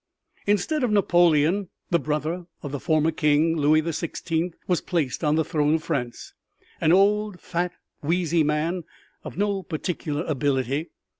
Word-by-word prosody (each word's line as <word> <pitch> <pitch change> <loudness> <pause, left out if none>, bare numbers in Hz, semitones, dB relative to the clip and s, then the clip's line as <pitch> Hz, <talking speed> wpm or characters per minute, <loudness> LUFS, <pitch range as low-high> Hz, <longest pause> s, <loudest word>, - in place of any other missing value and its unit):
Instead 210 - +1
of 245 - +2
Napoleon 175 -2 +3 0.2
the 170 - +4
brother 155 +4 -2 0.2
of 145 - -5
the 145 - -3
former 155 +2 +2
king, 155 +1 +2
Louis 155 0 +4
the 165 +1 -3
Sixteenth, 165 +1 -2
was 180 -2 +1
placed 165 -5 -2
on 150 0 +3
the 160 -1 +1
throne 150 -1 +2
of 160 - -2
France 125 -8 -4 0.5
an 155 - +4
old, 205 +1 +3
fat, 180 0 -2 0.3
wheezy 170 +1 +1
man 155 +4 0 0.4
of - - -8
no 200 -1 0
particular 160 -2 -3
ability. 140 +1 0
165 Hz, 150 wpm, -25 LUFS, 150-180 Hz, 0.5 s, the